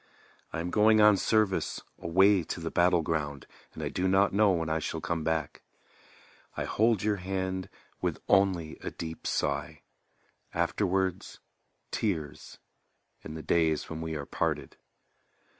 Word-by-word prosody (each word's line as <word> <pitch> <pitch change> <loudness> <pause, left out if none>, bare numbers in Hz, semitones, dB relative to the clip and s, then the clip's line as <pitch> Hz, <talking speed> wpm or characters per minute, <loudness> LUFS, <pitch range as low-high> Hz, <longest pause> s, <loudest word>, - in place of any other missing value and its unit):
I 80 - -3
am 90 +1 -4
going 110 +1 +5
on 105 -1 +7
service, 105 -1 +1 0.2
away 95 +3 +4
to 85 - -4
the 80 0 -4
battle 85 -1 +3
ground, 75 -3 -2 0.3
And - - -6
I - - -1
do 95 - -1
not 95 +1 +3
know 105 +1 +4
when 85 -3 0
I 80 0 0
shall - - -3
come 85 -2 -2
back. 80 -2 -2 1.0
I - - -1
hold 110 -2 +2
your 105 -1 +1
hand 95 0 -3 0.3
with - - -1
only 95 -5 +2
a - - -5
deep 80 -1 -7
sigh; 70 -1 -2 0.7
Afterwards, 95 -2 -1 0.5
tears 80 -9 -3 0.7
in 80 - -7
the 80 - -7
days 80 -2 +1
when 80 0 -5
we 80 0 -4
are 75 -2 -4
parted. - - -2
90 Hz, 145 wpm, -29 LUFS, 80-95 Hz, 1.0 s, on